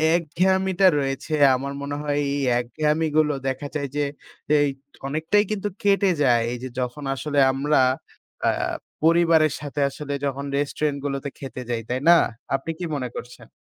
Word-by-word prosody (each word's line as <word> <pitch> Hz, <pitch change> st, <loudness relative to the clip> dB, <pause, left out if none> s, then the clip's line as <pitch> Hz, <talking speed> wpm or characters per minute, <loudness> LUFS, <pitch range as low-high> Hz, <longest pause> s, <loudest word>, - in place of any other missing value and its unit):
একঘেয়ামিটা 190 Hz, +3 st, +2 dB
রয়েছে 135 Hz, +3 st, -3 dB, 0.2 s
আমার 140 Hz, +2 st, -4 dB
মনে 145 Hz, 0 st, -4 dB
হয় 145 Hz, -1 st, -1 dB, 0.2 s
এই 140 Hz, -, -1 dB, 0.2 s
একঘেয়ামিগুলো 155 Hz, +3 st, +1 dB
দেখা 135 Hz, +2 st, -2 dB
যায় 140 Hz, -2 st, -1 dB
যে, 145 Hz, -, +1 dB, 0.6 s
এই 145 Hz, -, +3 dB, 0.4 s
অনেকটাই 160 Hz, +8 st, +2 dB
কিন্তু 205 Hz, -1 st, -1 dB, 0.2 s
কেটে 200 Hz, -1 st, +4 dB
যায়। 120 Hz, -3 st, +4 dB
এই 125 Hz, -, -3 dB
যে 130 Hz, -, -4 dB
যখন 125 Hz, +3 st, -3 dB
আসলে 145 Hz, +1 st, -1 dB
আমরা 145 Hz, +2 st, +1 dB, 0.7 s
আ -, -, +5 dB, 0.5 s
পরিবারের 165 Hz, -2 st, +4 dB
সাথে 145 Hz, 0 st, -4 dB
আসলে 145 Hz, +1 st, -6 dB
যখন 140 Hz, 0 st, -3 dB
রেস্টুরেন্ট 145 Hz, 0 st, -1 dB
গুলোতে 140 Hz, 0 st, -2 dB
খেতে 130 Hz, -2 st, -7 dB
যাই, 115 Hz, -2 st, -1 dB
তাই 125 Hz, +1 st, 0 dB
না? -, -, +10 dB, 0.4 s
আপনি 135 Hz, +4 st, -3 dB
কি 175 Hz, -, -3 dB
মনে 125 Hz, -3 st, -3 dB
করছেন? 125 Hz, -, -9 dB
145 Hz, 155 wpm, -23 LUFS, 135-160 Hz, 0.7 s, না